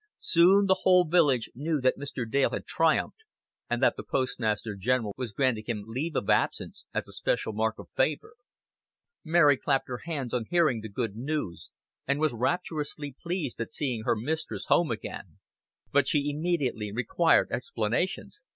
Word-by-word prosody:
Soon 185 Hz, +4 st, +5 dB
the 190 Hz, -1 st, +3 dB
whole 180 Hz, -1 st, +5 dB
village 145 Hz, -8 st, +3 dB
knew 150 Hz, +4 st, -1 dB
that 130 Hz, 0 st, +2 dB
Mr. 140 Hz, -4 st, -5 dB
Dale 135 Hz, +4 st, +2 dB
had -, -, -5 dB
triumphed, -, -, +1 dB, 0.5 s
and -, -, -1 dB
that -, -, +4 dB
the -, -, -6 dB
Postmaster 115 Hz, -4 st, -1 dB
General 110 Hz, +1 st, 0 dB
was 125 Hz, -4 st, -4 dB
granting 115 Hz, -3 st, 0 dB
him 110 Hz, -4 st, -3 dB
leave 135 Hz, +8 st, -4 dB
of 100 Hz, -, -1 dB
absence -, -, 0 dB
as -, -, -3 dB
a -, -, -12 dB
special 110 Hz, -, -1 dB
mark 110 Hz, +1 st, 0 dB
of -, -, -10 dB
favor. 145 Hz, +3 st, -1 dB, 0.9 s
Mary 155 Hz, -4 st, +5 dB
clapped 135 Hz, 0 st, 0 dB
her 125 Hz, -1 st, -5 dB
hands 140 Hz, -8 st, -4 dB
on 120 Hz, -3 st, 0 dB
hearing 155 Hz, -10 st, +2 dB
the 110 Hz, -, -7 dB
good 105 Hz, 0 st, -3 dB
news, 120 Hz, -, -4 dB, 0.4 s
and 140 Hz, +1 st, +1 dB
was 155 Hz, -3 st, +1 dB
rapturously 145 Hz, +1 st, -2 dB
pleased 170 Hz, -9 st, -3 dB
at 115 Hz, -, -4 dB
seeing 125 Hz, -6 st, -2 dB
her 115 Hz, -, +1 dB
mistress 115 Hz, -3 st, -3 dB
home 170 Hz, -, +4 dB
again; 115 Hz, -2 st, -6 dB, 0.5 s
but 140 Hz, -1 st, +3 dB
she 145 Hz, -1 st, +1 dB
immediately 145 Hz, -9 st, -1 dB
required 120 Hz, +9 st, +2 dB
explanations. 465 Hz, -, -2 dB
135 Hz, 165 wpm, -28 LUFS, 115-155 Hz, 0.9 s, Soon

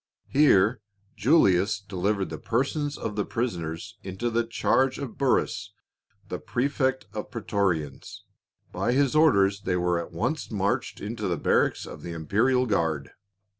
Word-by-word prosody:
Here 115 Hz, -6 st, +4 dB, 0.3 s
Julius 100 Hz, -, +3 dB
delivered 100 Hz, -1 st, -2 dB
the 80 Hz, -, -5 dB
persons 140 Hz, -, -1 dB
of 105 Hz, -, -4 dB
the 105 Hz, -, 0 dB
prisoners 90 Hz, -10 st, -4 dB
into 100 Hz, +5 st, -3 dB
the 115 Hz, +1 st, +2 dB
charge 130 Hz, +3 st, +1 dB
of 140 Hz, -5 st, -6 dB
Burrus, 105 Hz, -6 st, 0 dB, 0.5 s
the -, -, -4 dB
prefect 130 Hz, 0 st, -1 dB
of -, -, -5 dB
praetorians. 80 Hz, -9 st, -2 dB, 0.5 s
By 120 Hz, -, 0 dB
his 140 Hz, +1 st, +2 dB
orders 100 Hz, -11 st, +4 dB
they 95 Hz, -2 st, -1 dB
were 90 Hz, -1 st, +1 dB
at -, -, -12 dB
once -, -, -2 dB
marched -, -, -1 dB
into 105 Hz, 0 st, -4 dB
the 85 Hz, -2 st, 0 dB
barracks -, -, +1 dB
of -, -, -9 dB
the 85 Hz, -, -6 dB
imperial 115 Hz, -, +2 dB
guard. 80 Hz, -, -1 dB
105 Hz, 140 wpm, -26 LUFS, 90-130 Hz, 0.5 s, Here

